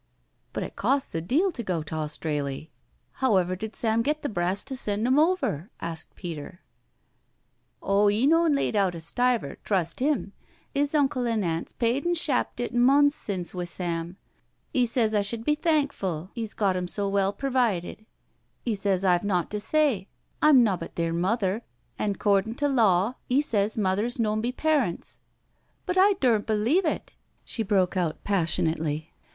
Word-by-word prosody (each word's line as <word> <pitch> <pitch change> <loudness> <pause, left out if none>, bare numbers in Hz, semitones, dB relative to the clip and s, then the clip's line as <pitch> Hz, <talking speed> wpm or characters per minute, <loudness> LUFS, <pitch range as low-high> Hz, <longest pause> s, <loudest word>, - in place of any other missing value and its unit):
" - - -44
But - - -2
it - - -7
costs 275 0 0
a 165 - -1
deal 305 - +1
to 255 - -5
go 180 -7 -2
t* 155 - -8
Australy. 150 -1 -3 0.5
However 190 -8 +2
did 220 +4 -6
Sam 225 0 +1
get 300 +5 -1
the 290 - -1
brass 180 -1 -1
to 270 0 -6
send 210 -3 -2
'em?" 275 - +2
asked 165 -1 -6
Peter. 170 0 -7 0.6
" - - -37
Oh, 200 +1 +3
'e 215 +5 +2
noan 330 +1 +4
laid 275 - 0
out 195 -4 +2
a - - -6
stiver, 240 - 0
trust 185 0 -1
'im— 275 -8 0 0.4
'is 285 +1 0
uncle 270 -4 +1
an' 225 -3 0
aunt's 165 -1 -3
paid 250 +7 0
an' 350 - +2
shappt 295 -6 0
it 245 - -3
mons 275 +4 +5
since 185 - -5
wi' 180 -1 -3
Sam. 170 0 -3 0.6
'£ 250 -2 +3
sez 225 -2 +2
I 210 - +3
shud 220 +3 -2
be 300 - +3
thankfu' 275 - -1
'e's 225 -3 -5
got 195 -4 +1
'em 180 0 -2
so 200 +2 -2
well 195 0 +1
pervided 225 -6 -1 0.3
— - - -44
'e 235 - +1
sez 195 -2 0
I've 175 -2 +3
naught 185 -4 0
to 210 - -2
say, 255 -5 +1 0.3
I'm 290 -5 +7
nobbut 185 -6 -2
theer 165 -1 -1
mother, 195 +4 0 0.4
an' 205 -2 0
'cordin' 205 +3 +1
to 290 - 0
law 225 -4 +2
'e 255 +2 +3
sez 215 -7 0
mothers 210 +4 0
noan 215 -2 0
be 240 +2 -1
parents 280 - 0 0.3
— - - -43
but 360 - -1
I 390 +2 +6
dumt 240 - +1
believe 230 - +2
it," 315 - -2 0.3
she 230 - -1
broke 195 -3 +1
out 170 -4 -1
passionately. 160 -4 0
210 Hz, 175 wpm, -26 LUFS, 180-255 Hz, 0.6 s, I'm